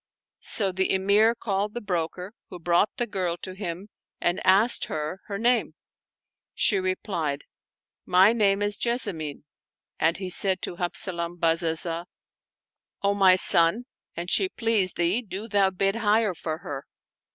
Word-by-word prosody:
So 200 -3 0
the 190 +1 0
Emir 205 +4 +3
called 205 -1 -3
the - - -2
broker, 180 -1 -4 0.2
who 180 - -8
brought 175 +4 +2
the 240 - 0
girl 185 -6 -2
to 185 - -5
him 190 +1 -6 0.3
and 175 +1 0
asked 205 +6 +3
her 155 +5 -5
her 200 - -4
name. 240 +2 +1 0.8
She 205 - +2
replied, 185 -6 -3 0.4
" - - -68
My 195 +4 +7
name 205 -3 +2
is 205 0 0
Jessamine"; 200 - -2 0.6
and 160 +2 +2
he 190 0 -5
said 190 +1 +3
to 175 - -5
Habzalam 175 -1 -2
Bazazah, 165 0 0 1.0
"O 200 0 +2
my 190 -2 +5
son, 180 +5 +4 0.3
an 170 - -4
she 370 - +2
please 225 - +1
thee, 175 +7 +1
do 205 -1 -7
thou 200 -3 +3
bid 195 +3 0
higher 215 -2 +2
for 160 -2 -5
her." 140 -4 -8
190 Hz, 150 wpm, -25 LUFS, 170-210 Hz, 1.0 s, My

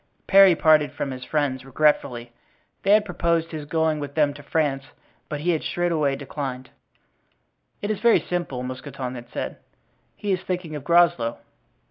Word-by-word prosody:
Parry 195 -2 +7
parted 155 -2 +4
from 135 - -4
his 130 -1 -7
friends 135 -2 -1
regretfully; 130 -4 0 0.5
they 195 - -2
had 210 0 +4
proposed 170 -3 0
his 155 -2 -6
going 160 0 0
with 145 -1 -6
them 150 -2 +2
to 145 - -11
France, 140 -3 -1 0.4
but 150 -1 -4
he 175 +3 +1
had 160 - 0
straightway 160 -5 0
declined. 135 -2 -6 1.1
"It 205 - 0
is 210 - -3
very 235 +1 +5
simple," 170 -8 -3
Mousqueton 130 0 -6
had 120 -1 -9
said; - - -5 0.6
"he 205 - -3
is 185 -1 0
thinking 180 -4 -4
of 145 - -6
Groslow." 170 -8 +3
150 Hz, 160 wpm, -24 LUFS, 135-170 Hz, 1.1 s, Parry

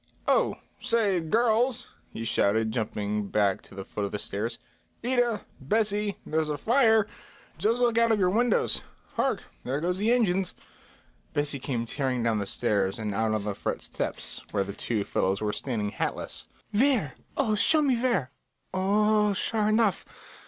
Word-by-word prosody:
"Oh, - - +3 0.2
say, 215 -6 +2
girls," 235 +7 +2 0.2
he 115 - -6
shouted, 110 0 +2
jumping 105 -2 -2
back 100 -2 +1
to - - -16
the 95 -1 -6
foot 105 - -4
of 100 - -2
the 105 - -2
stairs; 110 +4 -3 0.5
"Ida, 245 -3 +1 0.2
Bessie, 205 +6 0
there's 155 0 0
a 150 - -1
fire. 225 - +4 0.5
Just 230 +3 +2
look 235 -1 +3
out 230 0 +4
of 220 - +4
your 185 -2 +3
windows. 235 +2 +2 0.3
Hark, - - 0 0.2
there 135 +3 -1
go 175 +3 0
the 210 +5 +1
engines." 195 -6 +2 0.8
Bessie 145 -1 0
came 125 -3 -2
tearing 130 -1 -1
down 115 -2 +1
the 100 - -3
stairs 100 -5 0
and 105 -2 -3
out 110 +2 +1
on 105 - -2
the 105 0 -2
front - - -3
steps, - - -4
where 100 -2 0
the 100 +1 -6
two 110 0 -1
fellows 95 0 0
were 105 -1 -1
standing 110 -5 -2
hatless. - - -3 0.2
"Where? 220 - +2 0.2
Oh, 245 -6 +2
show 305 +9 +4
me 270 -3 +3
where! 235 - 0 0.4
O 185 - -1
o 210 +2 +3
oh, - - +1
sure 210 +2 +1
enough! 215 -2 +2
180 Hz, 170 wpm, -27 LUFS, -, 0.8 s, fire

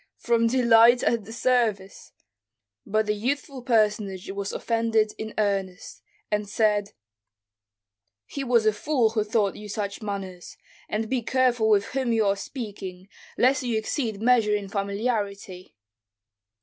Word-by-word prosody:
"From 230 -1 +2
delight 235 0 +5
at 230 -4 +1
the 220 - -10
service." 225 -5 -1 0.8
But 215 +1 +1
the 210 - 0
youthful 265 +4 -3
personage 210 -6 0
was 200 0 -4
offended 225 -2 0
in 220 0 -6
earnest, 195 -3 -2 0.3
and 210 -1 -1
said, 210 -1 +1 1.3
"He 280 - -5
was 240 -4 +2
a 215 - +4
fool 235 0 +1
who 220 -2 0
taught 210 -2 0
you 210 0 -9
such 200 +1 -4
manners, 195 -4 -6 0.3
and 220 +1 -2
be 255 +1 -1
careful 245 -2 +1
with 205 -2 +4
whom 260 -3 0
you 220 -2 +2
are 200 0 +2
speaking, 200 -5 -8 0.3
lest 260 +2 +3
you 240 -3 -1
exceed 220 -2 -3
measure 230 -4 +4
in 200 -1 -4
familiarity." 200 -2 -3
215 Hz, 135 wpm, -25 LUFS, 200-235 Hz, 1.3 s, delight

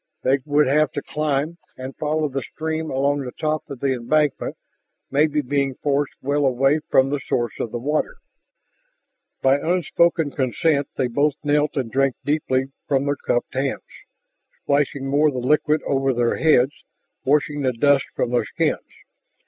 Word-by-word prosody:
They 135 +2 +3
would 150 0 +3
have 150 +3 +2
to 145 - -4
climb 150 +2 -2 0.2
and 130 +1 -7
follow 155 0 0
the 135 -1 -3
stream 160 +4 -4
along 140 +2 +1
the 130 -3 -5
top 155 0 -2
of 140 -4 -8
the 135 -1 +1
embankment, 145 +4 0 0.5
maybe 150 +2 +2
being 140 0 -1
forced 145 0 -1
well 145 +2 +1
away 135 +3 +3
from 130 +1 +4
the 145 - 0
source 120 -3 -2
of 115 - -3
the - - -3
water. 150 - -1 1.3
By 135 +1 +4
unspoken 170 -2 +1
consent 140 +3 +1
they - - +1
both 140 +4 +1
knelt 150 0 +1
and 125 -4 -2
drank 135 -1 +2
deeply 135 -3 0 0.2
from 135 -1 +1
their 145 0 +1
cupped 120 -3 -2
hands, 135 +1 -2 0.8
splashing 140 -1 0
more 145 +3 +3
of 145 - -1
the - - -1
liquid 150 +4 +2
over 135 -1 0
their 120 0 +1
heads, 145 -3 +3 0.4
washing 145 +1 +1
the 130 -2 +1
dust 140 +3 +3
from 120 - -1
their 120 - +1
skins. - - -1
140 Hz, 165 wpm, -22 LUFS, 130-150 Hz, 1.3 s, from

